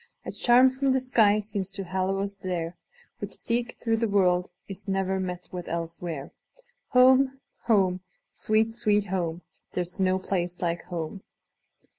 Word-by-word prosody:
A - - -4
charm 255 +2 +5
from 265 0 +1
the 265 - +3
sky 225 -5 +4
seems 205 -2 -3
to 195 - -4
hallow 190 +1 -1
us 200 0 -3
there, 180 -3 -4 0.4
Which, - - -5
seek 240 +1 -2
through 225 -1 -1
the 230 0 +1
world, 180 -3 +3 0.2
is 195 0 -9
ne'er 190 0 0
met 180 -1 -5
with 180 -1 -6
elsewhere. 165 -3 -4 0.6
Home! 260 +1 +5 0.3
home! 190 -5 +3 0.3
sweet, 220 +1 +1
sweet 210 -3 +2
home! 170 -2 -2 0.3
There 180 - 0
's 180 - -13
no 185 0 +3
place 180 -2 -2
like 170 -1 -2
home! 175 +2 -5
195 Hz, 155 wpm, -27 LUFS, 180-225 Hz, 0.6 s, charm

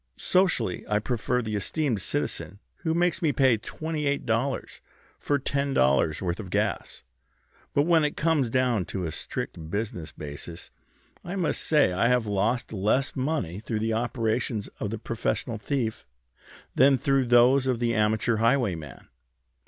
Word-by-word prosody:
Socially 180 - +1
I 105 - +2
prefer 125 +2 -1
the 110 -1 -3
esteemed 120 - -1
citizen 95 +1 -3 0.2
who 160 -1 -1
makes 175 +1 +1
me 160 -4 +3
pay 130 -4 +4
twenty 155 +6 -4
eight 140 0 0
dollars 120 +4 -2 0.4
for 145 - +1
ten 140 0 -1
dollars' 70 +5 +2
worth 85 +1 -2
of 100 -4 -7
gas; 65 - -2 0.7
but 145 - +4
when 165 -1 +4
it 150 - -1
comes 155 -6 +2
down 125 -5 +1
to 95 -1 -4
a 80 - -2
strict 80 +1 -5
business 100 -4 -3
basis 75 +3 -8 0.5
I 180 - -5
must 180 -5 0
say 150 - +3
I 100 +6 +2
have 125 -2 +2
lost 105 +4 0
less 110 +7 +1
money 130 - -2
through 110 0 -3
the 110 +1 0
operations 115 -1 -1
of 105 - -2
the 115 - -3
professional 115 +1 -2
thief 115 -3 -2 0.7
than 135 +1 +5
through 135 -1 +1
those 125 +3 +5
of 125 -2 +1
the 120 0 0
amateur 110 +1 +2
highwayman. 105 - 0
120 Hz, 155 wpm, -26 LUFS, 105-140 Hz, 0.7 s, than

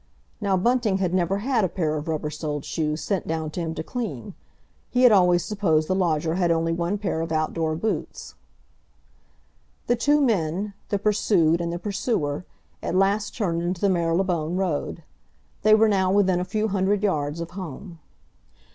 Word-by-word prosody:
Now 195 -2 +2
Bunting 230 0 +2
had 185 -2 -1
never 185 +1 +1
had 230 +1 +1
a 185 - +1
pair 160 -4 -1
of 150 +1 -4
rubber 155 -1 -2
soled 150 -1 -4
shoes 155 -1 -2
sent 195 -1 -2
down 160 -1 -2
to 175 - -5
him 165 -1 -3
to - - -4
clean. 200 - -5 0.6
He 250 0 +2
had 250 - +8
always 180 -3 +4
supposed 165 -7 +1
the - - +1
lodger 165 -4 +1
had 175 -1 +1
only 165 0 +1
one 175 +4 -1
pair 190 -5 -2
of 165 0 -4
outdoor 155 0 0
boots. 215 +7 -4 1.5
The 240 - +2
two 290 +5 +3
men—the 200 - -1
pursued 195 -5 +2
and 170 0 -2
the 170 - -3
pursuer—at 180 - -4
last 200 +3 +1
turned 170 -7 0
into 175 +1 -2
the 200 - +3
Marylebone 170 -1 0
Road; 170 -3 -2 0.6
they 215 +1 +6
were 220 +1 +5
now 190 -3 +2
within 190 -3 +3
a 180 - -2
few 215 +3 -1
hundred 195 +1 +1
yards 150 -5 0
of 170 0 -5
home. 175 -1 -8
180 Hz, 170 wpm, -24 LUFS, 160-205 Hz, 1.5 s, had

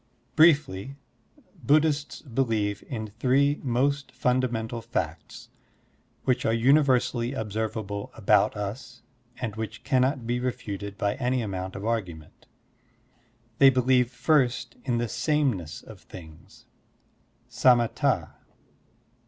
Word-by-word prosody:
Briefly, 140 - +3 0.7
Buddhists 150 0 +1
believe 115 -6 -1
in 110 -5 -6
three 140 +3 +2
most 140 +3 0
ftmda 125 0 +1
mental 115 0 -4
facts 115 +1 -5 0.7
which 130 - +1
are 110 - +1
universally 130 -1 +2
observable 110 -3 -4
about - - +2
us 120 +4 -6 0.3
and 115 -4 -4
which 110 0 -6
cannot 130 -2 +1
be 120 +1 -1
refuted 100 -5 -5
by 100 -2 0
any 125 -1 0
amount 95 -2 -5
of 100 +1 -6
argument. 90 -9 -4 1.1
They 135 - +8
believe 125 -1 +2
first 125 -3 +1
in 120 -3 0
the 120 0 -1
sameness 120 - -1
of 110 -3 -13
things 90 +6 -14 0.8
(samatd). 120 -1 +2
120 Hz, 105 wpm, -26 LUFS, 105-130 Hz, 1.1 s, They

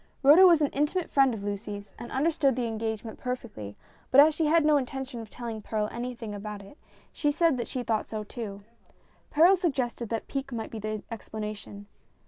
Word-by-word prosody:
Rhoda 315 +7 +9
was 335 -3 +5
an 290 - +2
intimate 300 +5 -1
friend 270 -2 +5
of 215 -4 -5
Lucy's, 205 0 -5
and 240 - -8
understood 280 -2 +2
the 250 -1 -1
engagement 220 0 -4
perfectly, 230 - -6 0.3
but 265 - +6
as 305 +2 +8
she 310 0 0
had 320 0 +4
no 300 -1 +5
intention 265 -1 -4
of 220 - -10
telling 230 -2 -6
Perral 210 0 -1
anything 240 -2 -5
whatever 205 -1 -6
about 210 -1 -6
it, 200 +10 -15 0.3
she 295 - 0
said 320 0 +3
that 240 - -3
she 255 - -3
thought 220 -2 -1
so, 215 -1 -4
too. 205 -2 -7 0.7
Perral 340 +6 +6
suggested 260 - -2
that 225 -1 -3
pique 275 0 -4
might 225 -2 -5
be 225 - -5
the 215 0 -4
explanation. 210 -2 -7
240 Hz, 195 wpm, -28 LUFS, 215-285 Hz, 0.7 s, Rhoda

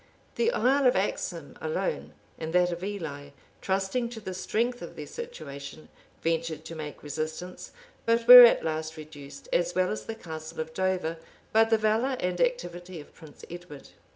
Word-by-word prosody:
The 465 0 +1
Isle 275 - +3
of 250 - +4
Axholme - - -2
alone, - - -2 0.3
and 160 0 -5
that 180 0 +3
of 175 +1 -5
Ely, 160 -8 -5 0.3
trusting 195 +5 -1
to 235 -2 -8
the 190 -3 -6
strength 230 +7 -1
of - - -8
their - - -7
situation, 155 - -8 0.3
ventured 165 -1 -1
to - - -7
make 150 -2 -7
resistance; 155 +4 -5 0.4
but 230 0 +2
were 250 0 +13
at 235 - +6
last 160 0 -3
reduced, 145 -2 -11
as 175 0 +1
well 185 0 +2
as 215 - -4
the 225 - -4
Castle 160 -6 -8
of 160 0 -4
Dover, 185 -3 -1 0.4
by 225 +1 +6
the 225 0 +3
valor 220 +5 +1
and 180 0 -1
activity 185 - -2
of 145 - -13
Prince 155 -3 -14
Edward. 175 -5 -10
180 Hz, 170 wpm, -28 LUFS, 160-230 Hz, 0.4 s, were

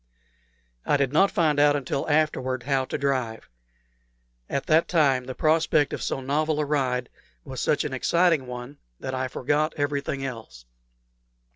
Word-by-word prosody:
I 145 - +2
did 140 -1 0
not 195 +6 +5
find 155 -5 +1
out 145 0 +5
until 140 +1 -2
afterward 140 -5 0
how 135 0 0
to - - -3
drive. 130 -6 -2 1.0
At 140 - -2
that 160 +1 +3
time 140 -7 +2
the 130 0 -6
prospect 155 -2 +2
of - - -4
so 135 - -2
novel 150 +3 0
a 150 - +1
ride 130 -4 0 0.4
was - - -6
such - - +1
an - - -4
exciting 170 -6 +2
one 125 +3 -8 0.2
that 130 - -5
I 130 0 -1
forgot 150 +5 -1
everything 140 -1 -2
else. 110 - -8
140 Hz, 155 wpm, -25 LUFS, 130-150 Hz, 1.0 s, not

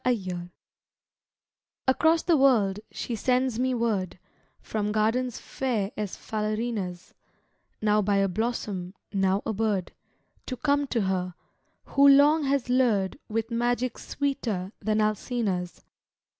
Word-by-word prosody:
ALLUREMENT 185 -8 -1 1.4
Across 320 +5 +3
the 340 - +3
world 225 -9 +3
she 235 - -4
sends 250 +1 +1
me 255 0 +1
word, 215 -7 -1 0.4
From 210 -1 -2
gardens 225 +3 +1
fair 225 -7 -2
as 210 -3 -4
Falerina's, 215 -4 -3 0.7
Now 210 0 +4
by 205 0 +1
a 195 0 +3
blossom, 200 -3 -3 0.2
now 195 0 +1
a 220 - -1
bird, 205 -3 -1 0.6
To 255 - -4
come 285 +1 +1
to 235 -3 0
her, 185 -2 -1 0.5
who 280 0 +4
long 290 +2 +6
has 275 -2 +1
lured 245 -4 +2
With 225 +2 -2
magic 240 +1 0
sweeter 225 -10 -2
than 215 0 +1
Alcina's. 215 -4 -1
220 Hz, 120 wpm, -27 LUFS, 195-255 Hz, 1.4 s, long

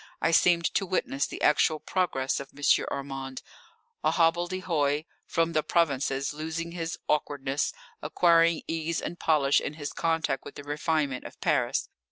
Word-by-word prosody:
I 165 - +2
seemed 170 0 +4
to 195 - +1
witness 140 -6 0
the - - -7
actual 150 +1 +3
progress 155 -9 -1
of 140 0 -8
M. 145 - -10 0.3
Armand, 135 -1 -5 0.6
a - - +4
hobbledehoy 165 -3 +1 0.2
from 165 0 +1
the 155 - +3
provinces, 140 -4 0
losing 160 +2 -4
his 165 -1 -4
awkwardness, 145 -2 0 0.3
acquiring 170 -1 +3
ease 165 0 -2
and 175 - -6
polish 145 -3 +3
in 150 - -4
his 145 -2 -5
contact 165 -4 0
with - - -10
the 145 - -8
refinement 145 -2 -1
of - - -10
Paris. - - +1
155 Hz, 150 wpm, -28 LUFS, 140-165 Hz, 0.6 s, seemed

